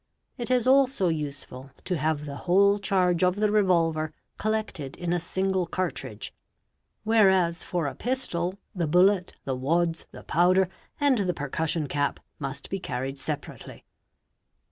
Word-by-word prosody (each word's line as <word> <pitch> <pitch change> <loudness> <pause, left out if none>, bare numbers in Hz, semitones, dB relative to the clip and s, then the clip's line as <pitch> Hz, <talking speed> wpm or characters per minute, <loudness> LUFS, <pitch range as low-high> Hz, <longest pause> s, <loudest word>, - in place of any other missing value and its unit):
| - - -52
It 240 - -3
is 250 -2 +2
also 260 -9 +4
usefw 140 -4 -5
to 185 - -1
have 150 0 -1
the 140 -1 -6
whole 200 +3 +5
charge 185 -3 +2
of 180 0 +3
the 210 0 +1
revolver 165 -6 +2 0.3
collected 215 -10 -2
in 175 -1 -2
a 175 - +1
single 190 +1 -1
cartridge 185 +2 -4 0.7
whereas 190 -6 +3
for 175 -3 -2
a 140 - -2
pistol, 195 -8 -2 0.2
the 170 -4 -1
bullet, 180 +3 +3
the 135 - -1
wads, 165 +5 0
the - - -11
powder, 180 +3 +3 0.3
and 280 -5 +3
the 180 -4 0
p 145 - -5
er 145 - -3
cussion 160 0 -1
cap 145 0 -1 0.2
must 140 0 -5
be 195 - -1
carried 135 -3 -4
separately. 150 +1 -6
175 Hz, 155 wpm, -26 LUFS, 155-195 Hz, 0.7 s, whole